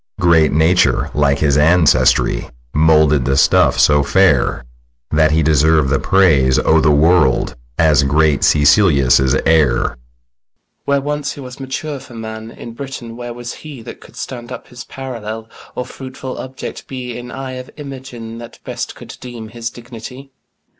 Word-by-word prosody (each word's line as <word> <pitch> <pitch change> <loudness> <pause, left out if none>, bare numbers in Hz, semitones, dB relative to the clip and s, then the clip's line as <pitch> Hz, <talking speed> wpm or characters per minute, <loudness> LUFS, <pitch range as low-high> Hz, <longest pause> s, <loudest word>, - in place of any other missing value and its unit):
SICILIUS. 90 - +2
Great 80 -2 +4
Nature 80 +4 +2
like 70 -1 +2
his 75 -1 +2
ancestry 75 -5 +3 0.2
Moulded 75 -3 +3
the 65 0 +1
stuff - - +4
so 75 -1 +4
fair 70 -7 +2 0.5
That 80 0 +3
he 80 +1 +2
deserv'd 75 -1 +3
the 70 - +1
praise 75 -9 +3
o' 80 0 +3
th' - - +2
world 75 -2 +3 0.2
As 75 -3 +4
great 75 +1 +2
Sicilius' 70 -5 +4
heir. 80 -5 +4
FIRST - - -2
BROTHER. - - -20 0.9
When 140 -1 +1
once 145 0 -3
he - - -12
was 130 0 -10
mature 135 +2 -5
for 120 - -14
man, 110 0 -7
In 115 0 -10
Britain 120 -3 -8
where 120 0 -7
was 120 0 -7
he 145 -7 -10
That - - -10
could - - -16
stand 120 -1 -7
up - - -9
his 125 -1 -10
parallel, 115 -4 -7 0.3
Or 125 - -4
fruitful 130 -1 -8
object 130 0 -8
be 125 -3 -6
In 120 0 -8
eye 130 +1 -6
of 130 0 -8
Imogen, 130 -5 -9
that 120 -1 -11
best - - -6
Could - - -11
deem 120 -3 -9
his 115 +1 -5
dignity? 120 +3 -11
110 Hz, 165 wpm, -17 LUFS, 75-125 Hz, 0.9 s, Great